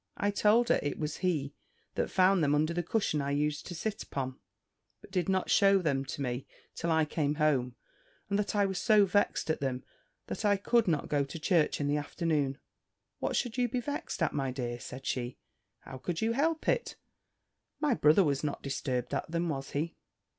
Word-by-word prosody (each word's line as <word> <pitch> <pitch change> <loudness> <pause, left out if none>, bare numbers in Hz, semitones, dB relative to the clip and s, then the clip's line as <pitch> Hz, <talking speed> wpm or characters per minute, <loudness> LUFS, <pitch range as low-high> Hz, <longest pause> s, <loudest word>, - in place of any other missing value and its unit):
I 205 - +1
told 220 +4 +3
her, - - +4
it 145 - -2
was 150 -1 -3
he 150 -6 -1 0.4
that - - -1
found 185 -2 +4
them 145 0 +3
under 155 +3 +1
the 175 - 0
cushion 175 -4 0
I 140 - -2
used 150 +1 -1
to 175 - -6
sit 210 +5 -3
upon; 130 -2 -4 0.6
but - - -16
did 180 -2 0
not 190 -1 +1
shew 195 -2 +5
them 135 -4 0
to 140 - -4
me 125 0 -3 0.3
till 170 - -3
I 160 -1 +3
came 150 -1 -1
home; 135 -5 +1 0.5
and 200 0 0
that 210 - -1
I 205 -1 +4
was 190 -2 -2
so 210 -2 +5
vexed 195 -4 +1
at - - -2
them, 130 -2 -2 0.4
that - - -5
I 205 -1 +4
could 230 +3 +2
not 155 -4 +1
go 145 -1 +1
to 140 +5 -7
church 165 -1 +2
in 145 - 0
the 145 +1 +2
afternoon. 145 -2 -1 0.6
"What - - -1
should 245 0 -1
you 245 -1 +2
be 250 +2 -1
vexed 285 - -3
at, 160 - +1
my 135 -2 -1
dear?" 120 -2 -4
said 130 +2 -8
she: 125 -1 -2 0.4
"how 130 -1 -9
could 165 +5 -3
you 225 +1 +1
help 310 +6 0
it? - - +1 0.8
My 295 -4 +2
brother 155 -1 +5
was 140 -3 0
not 145 -1 -3
disturbed 135 -3 -2
at - - -2
them, 170 +1 -1
was 135 -3 -3
he?" 155 +4 -3
155 Hz, 205 wpm, -31 LUFS, 140-200 Hz, 0.8 s, shew